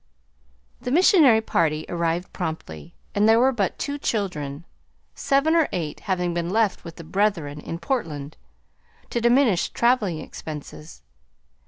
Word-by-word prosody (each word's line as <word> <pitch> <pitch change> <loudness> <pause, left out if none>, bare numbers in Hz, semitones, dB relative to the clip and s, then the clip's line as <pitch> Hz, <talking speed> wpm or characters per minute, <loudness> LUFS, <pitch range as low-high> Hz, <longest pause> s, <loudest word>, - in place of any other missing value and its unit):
The - - -4
missionary 300 - +5
party 155 -7 0
arrived 170 +1 -2
promptly, 160 - -6 0.2
and 210 +2 +3
there 225 +1 +6
were 260 +2 +4
but 205 -7 -1
two 285 0 -4
children, 170 - -3 0.5
seven 280 +4 +1
or 325 -3 +3
eight 155 -4 -4
having 180 -2 -1
been 170 0 -2
left 215 0 +1
with 170 -1 -9
the 165 - -10
brethren 165 -5 -1
in 165 - -6
Portland, 155 - -3 0.8
to 235 - -1
diminish 235 -5 +3
traveling 235 -8 +1
expenses. 150 - -9
185 Hz, 135 wpm, -24 LUFS, 160-235 Hz, 0.8 s, there